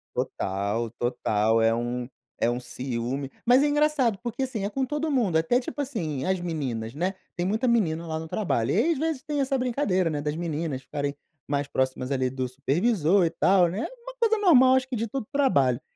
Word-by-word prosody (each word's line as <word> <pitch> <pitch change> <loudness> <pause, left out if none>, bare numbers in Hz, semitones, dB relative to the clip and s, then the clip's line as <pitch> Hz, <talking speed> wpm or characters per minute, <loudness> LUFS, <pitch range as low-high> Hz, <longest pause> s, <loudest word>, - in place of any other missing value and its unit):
Total, 100 +4 -2
total. 115 -2 +1
É 115 0 +4
um 120 +1 -2 0.3
é - - +2
um 120 - -2
ciúme. 125 +2 -4
Mas 250 +3 +5
é - - +3
engraçado 290 -7 +2
porque, 240 +2 -3
assim, 250 -6 -3
é 200 - -1
com 265 +5 -1
todo 295 +3 -2
mundo, 230 - +2
até 165 +10 +2
tipo, 255 +2 -5
assim, 170 - -3
as 190 +3 0
meninas, 130 -10 -3
né, 180 +6 -2 0.2
tem 175 - -2
muita 220 +6 0
menina 170 -9 +1
lá 160 -1 -3
no 160 - -7
trabalho, 160 - -1
e 230 - +3
às 325 - 0
vezes 315 -4 -1
tem 295 -1 -2
essa 270 0 +1
brincadeira, 240 -8 +1
né, 150 -3 -1
das 150 +1 -2
meninas 160 -5 -3
ficarem 145 -1 -3 0.3
mais 145 0 -1
próximas 130 -1 -1
ali 130 -2 +1
do 130 0 -3
supervisor 170 - +2
e 165 - 0
tal, 180 +1 +4
né, 185 +5 -4
é - - -2
uma - - -8
coisa 450 -2 +3
normal, 260 -11 +6
acho 260 0 +1
que 260 - -3
de 230 0 -1
todo 270 +3 -3
o - - -24
trabalho. 140 - +3
175 Hz, 210 wpm, -26 LUFS, -, 0.3 s, normal